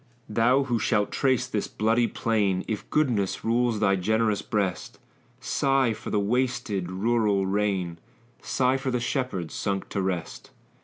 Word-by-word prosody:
Thou 120 +5 +3
who 120 -3 -1
shalt 105 -1 +1
trace 130 -3 +1
this 110 -6 -2
bloody 115 +2 +1
plain, 100 -6 0
If 110 -2 -4
goodness 120 -11 0
rules 115 -1 +1
thy 100 -2 +3
generous 110 +2 +1
breast, 100 -4 -2 0.4
Sigh 135 -2 +1
for - - -8
the 105 - +1
wasted, 110 -4 -1
rural 105 0 +1
reign; 95 -4 -1 0.4
Sigh 130 0 +1
for 135 0 -3
the 125 -1 0
shepherds, 120 - -2
sunk 100 -1 -2
to 100 - -2
rest! 90 -3 -4
110 Hz, 145 wpm, -26 LUFS, 100-125 Hz, 0.4 s, Thou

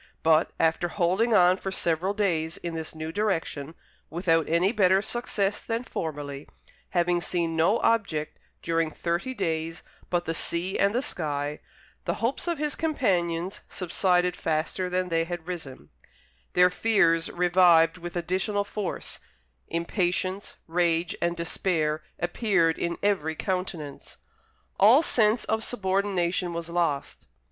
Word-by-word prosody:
But, 160 0 +4
after 165 +2 +2
holding 185 +6 +1
on 180 -1 +5
for 195 - -4
several 175 +2 0
days 170 -6 0
in 170 -1 -5
this 160 -1 -5
new 160 0 -5
direction, 165 -6 -2 0.3
without 165 -1 +1
any 170 +4 +3
better 190 -4 +4
success 205 -2 -2
than 230 +1 -2
formerly, 145 - -5 0.4
having 175 0 +1
seen 170 -2 -1
no 170 +8 +3
object 200 -10 0 0.2
during 165 -1 +1
thirty 175 - -2
days 165 -4 -2 0.3
but 175 -1 0
the 165 - -1
sea 170 +3 -2
and 200 +2 +3
the 250 - +1
sky, 145 - -3 0.5
the - - 0
hopes 235 +9 -2
of 340 -1 0
his 300 0 -1
companions 185 - 0
subsided 180 0 +1
faster 165 +4 -1
than 180 0 -1
they 165 -1 +1
had 175 -1 -6
risen; 140 - -7 0.6
their 180 0 +5
fears 180 -6 +2
revived 175 -1 +4
with 175 +1 -7
additional 185 +4 0
force; 200 -1 -4 0.5
impatience, 180 +3 -1
rage, 170 0 +1
and 170 0 0
despair 160 -2 -1 0.2
appeared 175 -2 +1
in 170 0 -2
every 160 -6 +1
countenance. 180 -7 -4 0.6
All 230 +10 +7
sense 220 -4 +3
of 220 0 0
subordination 190 -5 0
was 170 0 -4
lost. 170 -5 -2
175 Hz, 135 wpm, -27 LUFS, 165-195 Hz, 0.6 s, All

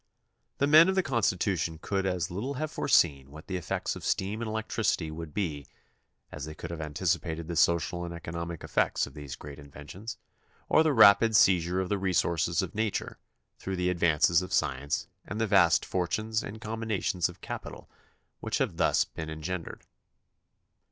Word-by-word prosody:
The 140 - +2
men 155 +5 +7
of 190 - +1
the 190 - +2
Constitution 95 - 0
could 95 +2 -1
as 90 -2 -2
little 120 +10 -3
have 155 +3 -3
foreseen 70 - +2
what 80 +2 -12
the 95 - -4
effects 90 -4 -2
of - - -9
steam 100 +4 -1
and 115 - -3
electricity 110 -6 -1
would 80 0 -7
be 75 -7 -3 0.6
as 75 -1 -6
they 80 0 -8
could 85 +2 -7
have 85 -2 -5
anticipated 80 +1 -2
the 85 - -4
social 85 +1 +2
and 85 - -5
economic 85 0 -6
effects - - +1
of 70 - -12
these 75 -3 -7
great 70 0 -10
inventions 75 +10 -9 0.5
or - - +5
the 160 -1 +3
rapid 110 -2 +6
seizure 90 -2 +4
of 95 -1 -2
the 100 - 0
resources 85 -2 +1
of 95 - -6
nature 110 -1 -2 0.4
through 95 - -4
the 90 0 0
advances 85 0 +3
of 90 - -7
science 70 +2 0 0.2
and 105 - -6
the 115 - +2
vast 95 -6 +4
fortunes 110 +5 -1
and 110 +1 -8
combinations 110 -5 -1
of 90 - -13
capital - - -7 0.5
which - - -2
have - - -1
thus - - +3
been 80 0 -7
engendered. 80 +3 -5
90 Hz, 170 wpm, -29 LUFS, 80-105 Hz, 0.6 s, men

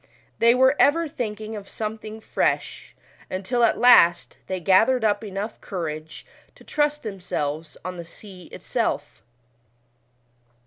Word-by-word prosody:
They 235 +1 +5
were 260 +2 +4
ever 330 +3 +4
thinking 220 -5 -5
of 205 -2 -9
something 220 0 -6
fresh, - - -2 0.3
uutil 200 +6 -1
at 230 - +3
last 175 -9 +5
they 185 -1 -3
fathered 220 +8 +3
up 205 0 +1
enough 205 +1 -5
courage 160 -4 -6 0.3
to - - -18
trust 295 0 -1
themselves 160 -7 -4
on 180 0 -5
the 170 - -6
sea 185 +1 -13
itself. - - -3
210 Hz, 125 wpm, -24 LUFS, 185-235 Hz, 0.3 s, They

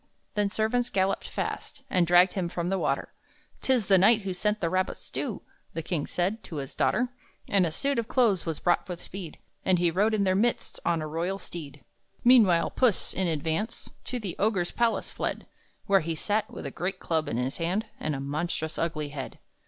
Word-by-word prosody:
Then 205 -1 +1
servants 220 +4 +1
galloped 195 -1 0
fast, 280 - -4
And 180 -2 +2
dragged 175 +2 +6
him 180 -3 -1
from 170 0 -2
the 195 0 +1
water. 145 -4 -1 0.5
"'Tis 255 -5 +2
the 190 -1 +5
knight 220 +4 +6
who 195 -1 -3
sent 210 +3 0
the 170 - 0
rabbit 185 +2 0
stew," - - -4 0.3
The 165 - -2
king 155 -3 -2
said, 195 +6 -1
to 165 - -7
his 135 -2 -5
daughter. 245 +1 +1 0.4
And 190 -3 +3
a - - -3
suit 275 - 0
of 230 - -2
clothes 225 -9 +3
was 165 -3 -3
brought 175 +2 +1
with 175 -1 -4
speed, 180 -5 -8 0.3
And 185 -1 +3
he 175 -1 +2
rode 210 +6 +2
in 205 - +2
their 185 -1 +3
midst, 230 +5 0
on 165 -2 +1
a - - -3
royal 170 +5 -2
steed. 150 -8 -9 0.4
Meanwhile 220 -9 +6
Puss, 245 -7 +2
in 190 -1 0
advance, 160 +7 -2
To 250 - -2
the 195 -6 -4
Ogre's 195 -4 +1
palace 235 -1 0
fled, - - -3 0.4
Where 195 0 +5
he 165 +1 -2
sat, 210 +6 0
with - - -7
a 140 - -4
great 180 +5 -2
club 160 -2 0
in 115 - -1
his 125 +2 -1
hand, 180 +6 0
And 155 -1 -1
a - - -4
monstrous 155 +3 -2
ugly 155 -3 -1
head. 140 -3 -6
180 Hz, 205 wpm, -28 LUFS, 165-210 Hz, 0.5 s, dragged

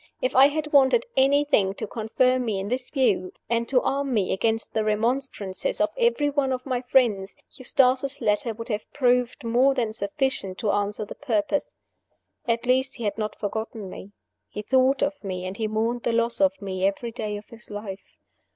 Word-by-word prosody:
If - - -1
I 270 +1 +8
had 300 +1 -3
wanted 280 - +5
anything 270 -8 +3
to - - -4
confirm 250 +4 +1
me 215 -5 -1
in 195 +1 -4
this 250 +1 -3
view, 210 -10 +1 0.2
and 235 0 0
to 255 -2 +3
arm 275 -2 0
me 200 -4 +1
against 225 +3 -1
the 220 - +1
remonstrances 220 - -1
of - - +2
every 470 -12 +2
one 285 -2 0
of 255 -1 -3
my 255 -3 -1
friends, 230 -7 +2 0.2
Eustace's 260 +1 +2
letter 210 +3 +1
would 230 +2 -8
have 210 -1 -4
proved 250 -1 +1
more 250 +4 +3
than 230 -4 -1
sufficient 200 -2 -2
to 215 -4 0
answer 205 +1 -1
the - - -8
purpose. 250 +1 -1 0.7
At 235 +1 0
least 260 +2 +1
he 240 - -7
had 205 0 -2
not 215 0 -3
forgotten 215 -1 -5
me; 195 - -10 0.4
he 210 - -6
thought 260 +3 +3
of 285 -2 -2
me, 185 -2 -4
and 185 +2 -5
he 220 - -1
mourned 225 +3 -1
the 235 - -1
loss 235 +2 +1
of 285 0 +3
me 190 -1 -4
every 200 +5 0
day 215 -3 -4
of 205 - -12
his 230 0 -13
life. 205 -2 -8
235 Hz, 190 wpm, -25 LUFS, 210-265 Hz, 0.7 s, I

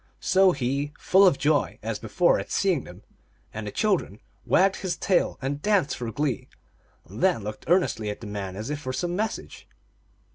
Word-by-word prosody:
So 190 0 +4
he, 140 +1 -2
full 195 +1 +5
of 155 - +3
joy, 145 0 +1
as - - -3
before, - - +2
at - - -6
seeing - - +1
them - - -13 0.5
and 110 0 -5
the - - -4
children, 190 - 0 0.3
wagged 190 +2 +4
his 185 -3 -3
tail 190 - +1
and 140 +2 -2
danced 200 -7 +2
for 120 -2 -5
glee, 140 -1 -2 0.6
and 105 +6 -9
then 180 - +2
looked 105 +1 -7
earnestly 170 - +2
at 105 - -5
the - - -9
man 100 -2 -5
as 110 +7 -5
if 150 - -3
for 130 -1 -4
some 175 +4 -2
message. 215 +3 -4
145 Hz, 185 wpm, -26 LUFS, -, 0.6 s, full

